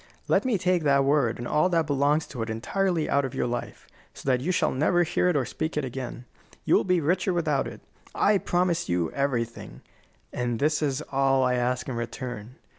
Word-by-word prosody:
Let - - +2
me 245 -5 +2
take 180 -1 +1
that 140 -2 +3
word 140 -5 +2
and 120 - -5
all 155 +5 +2
that 165 -3 +2
belongs 145 +2 +1
to 125 -4 -6
it 115 - -3
entirely 165 - -1
out 140 - +2
of 130 - -4
your - - 0
life, 120 0 -5 0.3
so - - -12
that 125 -1 +1
you 170 +7 0
shall 180 - +1
never 165 +6 +2
hear 180 +2 +1
it 175 - +1
or 135 -3 +1
speak 155 +4 -4
it 150 - 0
again. 125 -1 -6 0.4
You - - +2
will - - +5
be 180 -2 +2
richer 180 +4 +1
without 155 -5 0
it. - - -9 0.3
I 205 -1 +3
promise 175 -1 0
you 85 -2 0
everything, 115 - -3 0.5
and 120 -1 -1
this 150 +4 +1
is 145 -1 -1
all 135 -1 +3
I 125 0 +2
ask 125 0 -1
in 130 - -3
return. 120 0 -6
140 Hz, 210 wpm, -26 LUFS, 125-165 Hz, 0.5 s, will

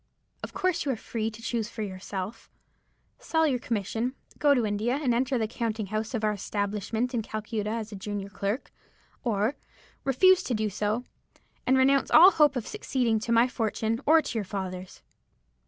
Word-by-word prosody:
Of - - -6
course 370 -3 0
you 285 - 0
are - - -1
free 220 0 -3
to 225 +1 -12
choose 230 -2 -2
for 220 -2 -5
yourself. 190 +2 -6 0.7
Sell 320 -10 +1
your 265 -5 +1
commission, 230 +3 -2 0.2
go 290 -1 +5
to 240 -4 +1
India, 215 +6 0
and 260 -5 +1
enter 260 +2 +1
the 220 -2 0
counting 220 -1 -2
house 220 +3 -2
of 220 - -2
our 215 - +3
establishment 210 +4 -2
in 235 - 0
Calcutta 215 0 -4
as 220 -1 -3
a - - -6
junior 200 0 -5
clerk; 200 +5 -3 0.5
or 220 +2 0 0.5
refuse 370 +8 +5
to 250 - -2
do 215 -1 -1
so, 210 +4 -1 0.6
and 260 +1 +5
renounce 265 -1 +4
all 360 +4 +9
hope 300 -5 +4
of 250 - -2
succeeding 250 - 0
to 225 +2 -4
my 230 +1 +5
fortune 225 -1 -1
or 320 +1 +6
to 235 - -4
your - - -2
father's.' 185 -2 -6
225 Hz, 180 wpm, -27 LUFS, 210-260 Hz, 0.7 s, all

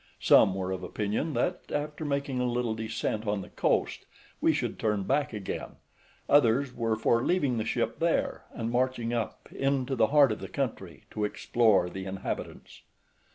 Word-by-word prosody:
Some 95 - +5
were 95 -1 -2
of 95 -1 -3
opinion 105 - -2
that, 175 +9 -1
after 150 +1 -3
making 140 -2 -1
a 125 0 +1
little 120 -2 0
descent 110 0 -3
on 105 -1 0
the - - -12
coast, - - 0 0.3
we - - +4
should - - -2
turn 105 -3 0
back 140 +6 +1
again; 105 -4 -5 0.5
others 135 -1 +4
were 115 -2 0
for 115 +2 +2
leaving 140 -10 +1
the 110 - -2
ship - - -1
there, - - 0
and 115 0 -4
marching 120 -1 0
up 115 -2 -3
into 135 -1 0
the 115 -3 +4
heart 145 0 +5
of - - -3
the - - -7
country, 95 - -4
to 105 - -3
explore 105 -2 +2
the 95 +1 -6
inhabitants. 95 0 -6
115 Hz, 170 wpm, -29 LUFS, 105-135 Hz, 0.5 s, Some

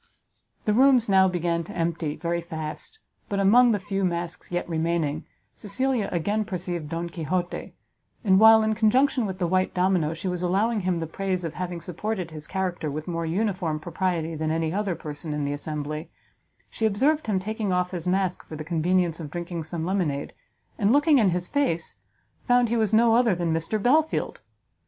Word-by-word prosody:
The 210 - +2
rooms 255 0 +5
now 190 -1 +5
began 170 -2 -1
to - - -9
empty 165 -2 -1
very 170 0 -2
fast, 160 - -6 0.3
but 200 - -1
among 235 +5 +6
the 210 - +2
few 195 0 -3
masks 175 -1 -3
yet 175 0 -2
remaining, 165 -2 -1 0.3
Cecilia 245 +1 -1
again 205 +5 0
perceived 175 -6 -4
Don 170 +1 -3
Quixote; 175 +1 -3 0.5
and 190 -3 +5
while, 220 0 +8
in 220 0 +1
conjunction 230 +2 +2
with 190 -1 -5
the 180 - 0
white 185 +2 +1
domino, 180 -4 +1
she 170 +4 -5
was 180 -1 -2
allowing 205 +6 +1
him 185 -2 0
the 165 - -2
praise 185 +2 -2
of 165 -2 -4
having 180 -1 -4
supported 180 0 -4
his 155 -1 -8
character 185 -5 -2
with 155 +3 -5
more 165 -1 -2
uniform 180 -4 -1
propriety 165 0 -2
than 155 0 -2
any 160 0 0
other 200 -3 -1
person 150 0 -5
in 150 -1 -2
the 140 - -1
assembly, 150 +1 -5 0.6
she 220 - +1
observed 275 +8 +1
him 205 -3 +1
taking 215 +1 -3
off 180 0 0
his 175 -2 -5
mask 185 0 0
for 155 - -7
the 155 - -5
convenience 170 +1 +1
of 155 -3 -6
drinking 170 +1 -5
some 160 +1 -4
lemonade, 170 -7 -1 0.5
and, 205 +1 +3
looking 290 +1 +5
in 210 -5 +4
his 180 0 -1
face, 180 - -1 0.5
found 245 -2 +4
he 235 - +1
was 220 -2 +1
no 225 +1 +5
other 230 -4 +4
than 170 -2 -1
Mr 165 +7 -1
Belfield! 300 +9 +1
180 Hz, 185 wpm, -25 LUFS, 165-210 Hz, 0.6 s, while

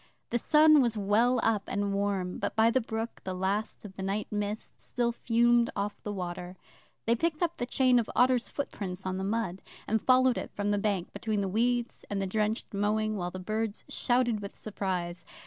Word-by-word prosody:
The 240 - +1
sun 305 +3 +6
was 235 -3 +1
well 225 +5 +3
up 220 -3 +2
and 200 0 -1
warm, 195 -2 -1
but - - -2
by 220 +1 +5
the 260 +2 +2
brook 225 0 -4
the 185 -1 -4
last 195 +4 -2
of 190 -2 -10
the 190 - -6
night 195 +2 -1
mist 210 +1 -4
still 240 -1 0
fumed 235 0 +3
off 205 +1 -3
the 210 - -4
water. 180 -1 -5 0.5
They 230 - +3
picked 320 +5 0
up 340 0 -1
the 245 - -2
chain 255 -1 +4
of 230 - -2
otter's 250 -1 +3
footprints 190 -9 -5
on 185 0 -2
the - - -2
mud, 200 -3 -2 0.3
and 220 0 +1
followed 255 -1 +4
it - - -6
from 205 0 0
the 205 - +1
bank, 200 -4 -1
between 210 0 -1
the 195 - -1
weeds 240 +4 0
and 200 - -1
the 195 - 0
drenched 215 +4 -1
mowing, 215 +2 0
while 180 -3 -2
the 185 - -7
birds 215 +3 -2
shouted 240 -3 +1
with 200 -1 -8
surprise. 180 -4 -3
215 Hz, 200 wpm, -29 LUFS, 195-235 Hz, 0.5 s, sun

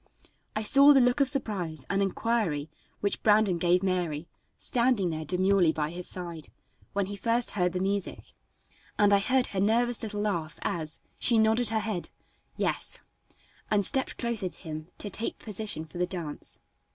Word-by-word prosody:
I 215 - -1
saw 275 +6 +7
the 275 - +6
look 245 +2 +3
of 275 -2 +3
surprise 185 - -3
and 195 0 0
inquiry 195 -7 0 0.3
which 200 - -1
Brandon 210 -4 +4
gave 180 +2 +3
Mary, 175 -4 -1 0.3
standing 235 -7 +1
there 160 0 -3
demurely 185 0 +3
by 155 -1 -2
his 175 +1 -5
side, 170 -4 -5 0.5
when 200 -1 +1
he 205 +2 -5
first 230 +4 +1
heard 180 -3 0
the 180 - -1
music, 195 0 -3 0.6
and 205 -1 +5
I 200 - +6
heard 255 +5 +2
her 190 - -1
nervous 235 +4 +2
little 210 -2 -3
laugh 170 -7 -2
as, 160 -2 -3 0.2
she 235 - +4
nodded 220 +1 +3
her 220 -1 0
head, 210 -5 -3 0.5
"Yes," - - -1 0.7
and 205 -2 +2
stepped 265 +5 0
closer 230 -6 -1
to - - -11
him 155 -1 -7
to 205 - -5
take 225 - -2
position 210 -6 -2
for 175 +2 -9
the 180 - +1
dance. 170 -5 -4
200 Hz, 170 wpm, -28 LUFS, 175-225 Hz, 0.7 s, saw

